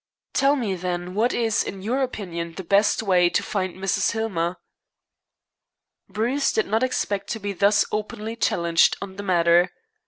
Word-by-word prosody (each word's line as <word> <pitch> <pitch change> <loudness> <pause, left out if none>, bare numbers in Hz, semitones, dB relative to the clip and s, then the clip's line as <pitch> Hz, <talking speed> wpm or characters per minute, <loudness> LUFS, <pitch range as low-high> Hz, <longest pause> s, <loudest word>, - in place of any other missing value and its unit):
"Tell 275 +1 +3
me, 230 -8 -1
then, 180 0 -4
what 225 +5 +1
is, 225 -2 +1
in 195 -1 -7
your 250 +6 0
opinion, 170 -9 -4
the 190 - -6
best 200 +4 +2
way 180 -4 +4
to - - 0
find 185 -4 -3
Mrs. 190 +3 0
Hillmer." 185 -6 -2 1.5
Bruce 245 +6 0
did 445 - +1
not 220 +1 0
expect 205 -6 -1
to 225 - -3
be 205 -1 -4
thus 200 +2 +3
openly 215 +1 -4
challenged 170 -6 +2
on 190 -1 -8
the - - -4
matter. 175 -2 +3
200 Hz, 160 wpm, -23 LUFS, 180-225 Hz, 1.5 s, way